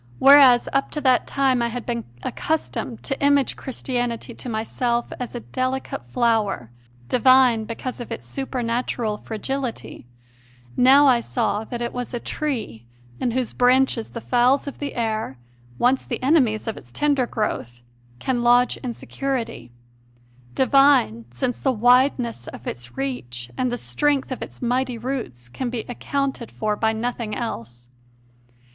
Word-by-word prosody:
Whereas 270 -3 +7
up 275 0 +1
to - - -1
that 260 -2 +3
time 265 -3 +2
I 235 - +1
had 240 +1 -5
been 235 -1 -3 0.2
accustomed 305 -6 -3
to 270 0 -3
image 285 -2 +3
Christianity 245 -3 -3
to 250 - -8
myself 235 +2 -1
as 250 0 -5
a 240 - -4
delicate 255 - -3
flower, 210 - 0 0.4
divine 250 - +5
because 240 +3 -5
of 240 - -7
its 230 - -5
supernatural 240 -4 -2
fragility, 240 - -5 0.7
now 270 +3 +6
I 255 -3 +5
saw 220 -3 -1
that 240 +1 -4
it 235 - -3
was 245 0 -4
a - - -2
tree 230 - -4 0.3
in 250 - 0
whose 250 0 -2
branches 250 -2 +3
the 230 - -7
fowls 250 +4 +3
of 280 - -7
the 285 -1 -4
air, 220 - -2 0.4
once 260 +2 +2
the - - -5
enemies 255 -7 +3
of 225 - -3
its 120 - -13
tender 280 - +1
growth, 120 - -3 0.4
can 245 - -1
lodge 245 +1 +4
in 245 -2 -5
security 235 - -4 0.8
divine 265 - +4
since 125 - -3
the 265 - +1
wideness 245 - +2
of - - -9
its 120 0 -7
reach 120 -2 -4
and 255 -1 0
the 245 - -2
strength 285 +1 0
of 255 - -4
its - - -8
mighty 250 0 0
roots 225 - -5
can 245 - -4
be 240 -2 -3
accounted 265 -1 -3
for 215 -1 -2
by 220 +1 +1
nothing 225 -1 -3
else. 120 - -5
245 Hz, 150 wpm, -23 LUFS, 220-260 Hz, 0.8 s, Whereas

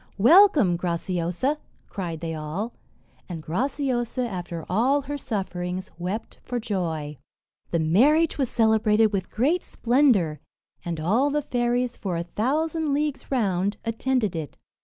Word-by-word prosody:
"Welcome, 275 - +6
Graciosa!" 175 - -1 0.3
cried 170 -5 -5
they 165 -1 -3
all; 160 +9 -4 0.6
and 170 -2 -5
Graciosa, 250 - -1
after 175 -5 -5
all 250 +10 +2
her 290 +2 -4
sufferings, 185 -7 -4
wept 185 +6 -4
for 245 -1 -3
joy. 165 - -3 0.5
The 170 - 0
marriage 270 - +3
was 265 -4 +1
celebrated 220 -1 +3
with 190 -2 -2
great 295 +11 +1
splendour; 235 - +2 0.4
and 170 -2 -4
all 220 - +2
the 295 +1 0
fairies, 245 -1 0
for 185 -4 -3
a 170 - -2
thousand 295 - -1
leagues 295 -1 -2
round, 200 -5 0
attended 230 -3 0
it. 155 -4 -5
215 Hz, 130 wpm, -25 LUFS, 175-265 Hz, 0.6 s, Welcome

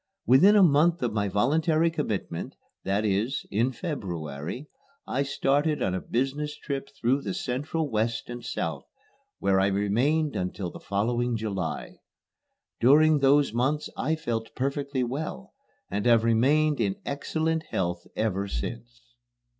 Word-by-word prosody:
Within 165 - +6
a 205 - +7
month 165 0 +4
of 120 -3 0
my 105 -1 0
voluntary 155 - +2
commitment, 105 - -3 0.3
that 100 +3 0
is, 110 +7 0
in 115 +6 +1
February, 90 - -5 0.4
I 135 - -1
started 140 +2 +1
on 90 - 0
a 95 - -2
business 145 +4 -2
trip 140 -2 -4
through 130 +4 +2
the 180 - -4
Central 155 -1 -2
West 115 -1 -1
and 120 0 -7
South, - - -3 0.5
where 95 -1 +2
I 95 - +3
remained 120 +10 +1
until 90 0 -3
the - - -10
following 120 +4 0
July. 100 -6 -4 0.8
During 150 +5 +5
those 140 -2 +4
months 135 +6 0
I 155 +4 0
felt 115 -7 -4
perfectly 140 0 -1
well, 125 - -5 0.4
and 100 0 -1
have 115 -2 +5
remained 140 +6 +3
in 100 -3 +1
excellent 160 +3 -1
health 85 -1 -2
ever 100 -2 -1
since. 120 - -6
125 Hz, 140 wpm, -27 LUFS, 105-150 Hz, 0.8 s, a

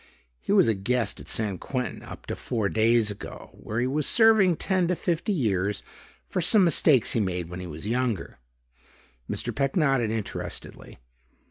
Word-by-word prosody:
He - - -4
was - - +5
a 115 - +3
guest 110 +3 -1
at - - -11
San 105 -4 -1
Quentin 125 -6 -4
up - - -11
to - - -4
four 110 -5 -2
days 110 0 +2
ago 100 - -9
where 110 +2 -5
he 120 - +1
was 140 +2 0
serving 220 -6 +5
ten 185 +1 +1
to 180 - +1
fifty 170 +4 -1
years 105 - -1 0.4
for 180 - -2
some 195 +4 +5
mistakes 150 -7 +4
he - - +1
made 90 -4 -2
when 90 +1 -7
he 90 - -6
was 80 +1 -8
younger." 115 - -2 0.9
Mr. - - -2
Peck 135 -1 -1
nodded 135 - +2
interestedly. 110 -2 -6
120 Hz, 170 wpm, -26 LUFS, 100-155 Hz, 0.9 s, was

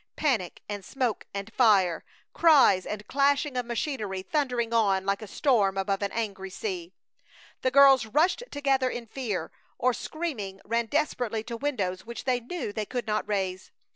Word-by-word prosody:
Panic 235 - -1
and 205 -1 -5
smoke 250 -1 -2
and 200 +3 -6
fire! 195 -8 +4 0.3
Cries 270 - +5
and 210 0 -5
clashing 280 +2 +1
of 250 -1 -2
machinery 220 -6 -3
thundering 250 -4 -1
on 195 -4 +2
like 200 +1 0
a 215 - -7
storm 200 -6 +2
above 195 +1 -1
an 200 - -1
angry 200 -4 -3
sea! 360 - -5 0.7
The 260 - +2
girls 270 -3 +6
rushed 315 - +2
together 270 -3 +1
in 240 -1 -5
fear, 225 -5 -4 0.3
or, 255 0 +2
screaming, 235 - -5
ran 230 +2 0
desperately 245 -6 -1
to 235 +1 -6
windows 210 -9 -2
which 235 +1 -7
they 255 -2 +1
knew 250 -3 -5
they 210 -1 -3
could 245 -3 -3
not 215 -1 -1
raise! 190 -2 -2
230 Hz, 165 wpm, -27 LUFS, 200-270 Hz, 0.7 s, girls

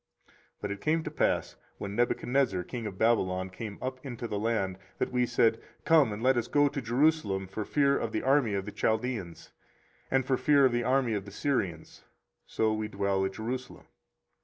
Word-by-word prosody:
24:035:011 - - -28 0.3
But 105 - -3
it 100 0 -5
came 160 +1 +1
to - - -5
pass, - - 0 0.2
when 100 0 -5
Nebuchadrezzar 120 -4 +1
king 115 +3 -5
of 95 -2 -7
Babylon 95 -5 +1
came 105 +1 -7
up 130 0 -4
into 120 -3 -5
the 105 -2 -3
land, 100 -4 -1 0.2
that - - -1
we 125 -1 +1
said, 115 -2 +2 0.2
Come, 155 -8 +5
and 105 +2 -5
let 130 0 +4
us 120 0 0
go 145 0 +4
to 140 0 -3
Jerusalem 120 -5 +1
for 100 +3 -5
fear 140 +5 +2
of 115 - -3
the - - -2
army 130 -6 +3
of 95 -1 -2
the 105 - -6
Chaldeans, 110 -9 -2 0.6
and 130 -1 +2
for 130 -1 +1
fear 140 0 +4
of 130 - +4
the 120 0 0
army 130 -1 +2
of 100 -2 -3
the 100 - -10
Syrians: 95 - -2 0.4
so 110 -1 +1
we 110 0 -2
dwell 100 -1 0
at 95 - -3
Jerusalem. 125 +4 -5
115 Hz, 200 wpm, -29 LUFS, 100-130 Hz, 0.6 s, Come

